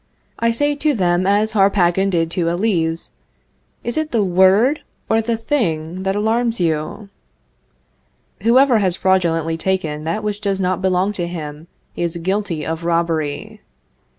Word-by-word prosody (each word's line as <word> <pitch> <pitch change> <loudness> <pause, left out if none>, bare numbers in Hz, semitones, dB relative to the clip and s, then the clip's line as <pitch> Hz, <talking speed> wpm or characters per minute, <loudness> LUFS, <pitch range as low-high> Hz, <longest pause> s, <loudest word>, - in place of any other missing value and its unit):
I 230 - +2
say 290 +6 +1
to 295 -1 +1
them 180 -2 +1
as 210 +2 +2
Harpagon 195 -2 +3
did 165 -3 0
to 170 -1 0
Elise, 170 -3 -1 0.7
Is 240 - -3
it 315 0 -1
the 225 -3 +2
word 195 +10 +4 0.3
or 225 0 +2
the 230 +1 -1
thing 180 - -2
that 195 0 -1
alarms 225 +2 0
you? 170 +5 -2 1.3
Whoever 245 0 +4
has 185 -4 +2
fraudulently 165 -4 +1
taken 165 -4 -2
that 190 +7 -2
which 210 0 -3
does 200 -2 -1
not 185 -1 0
belong 190 +1 +1
to 175 -4 -3
him, 155 -2 -7 0.3
is 170 -1 -2
guilty 180 -2 -2
of 165 +1 -4
robbery. 165 -3 -1
190 Hz, 145 wpm, -19 LUFS, 170-215 Hz, 1.3 s, word